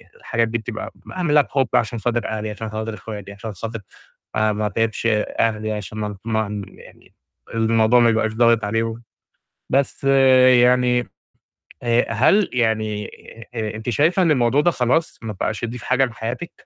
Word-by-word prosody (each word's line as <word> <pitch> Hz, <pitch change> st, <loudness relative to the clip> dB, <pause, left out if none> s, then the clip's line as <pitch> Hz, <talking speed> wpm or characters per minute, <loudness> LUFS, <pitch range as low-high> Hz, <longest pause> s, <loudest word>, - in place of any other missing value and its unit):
الحاجات 115 Hz, 0 st, -1 dB
دي 115 Hz, +1 st, -1 dB
بتبقى 110 Hz, 0 st, -6 dB
ب -, -, -15 dB
اعملها 155 Hz, -5 st, +3 dB
بِحُب 135 Hz, -2 st, 0 dB
عشان 120 Hz, -1 st, +1 dB
خاطر 120 Hz, +1 st, -1 dB
اهلى 110 Hz, 0 st, -3 dB
عشان 110 Hz, +1 st, -6 dB
خاطر 110 Hz, +1 st, -4 dB
اخواتي 105 Hz, -1 st, -8 dB
عشان 105 Hz, +1 st, -7 dB
خاطر 115 Hz, +4 st, -6 dB, 0.6 s
ما 110 Hz, 0 st, +2 dB
ما 105 Hz, 0 st, -2 dB
أتعِبش 115 Hz, +2 st, -1 dB
أهلي 110 Hz, 0 st, 0 dB
عشان 105 Hz, 0 st, -6 dB
ما 105 Hz, -1 st, -4 dB
ما 110 Hz, -2 st, -1 dB
يعني -, -, -17 dB, 0.4 s
الموضوع 115 Hz, +1 st, +3 dB
ما 115 Hz, -, +5 dB
يبقاش 110 Hz, -1 st, +1 dB
ضاغط 115 Hz, 0 st, +3 dB
عليه 115 Hz, +2 st, 0 dB
و 115 Hz, 0 st, -4 dB, 0.7 s
بس 135 Hz, +1 st, 0 dB
يعني 125 Hz, -2 st, +5 dB, 0.8 s
آآ 120 Hz, -1 st, +1 dB
هل 165 Hz, -, +3 dB
يعني 110 Hz, -3 st, 0 dB, 0.5 s
آآ 110 Hz, -2 st, -3 dB
أنتِ 110 Hz, +2 st, -4 dB
شايفة 160 Hz, +9 st, +2 dB
إن 170 Hz, -, +3 dB
الموضوع 130 Hz, -1 st, +3 dB
ده 175 Hz, -, +3 dB
خلاص 130 Hz, +3 st, 0 dB
ما 110 Hz, -1 st, -4 dB
بقاش 105 Hz, +3 st, -3 dB
يضيف 120 Hz, 0 st, -5 dB
حاجة 130 Hz, +1 st, +3 dB
لحياتِك. 120 Hz, +7 st, -6 dB
115 Hz, 160 wpm, -21 LUFS, 110-125 Hz, 0.8 s, ما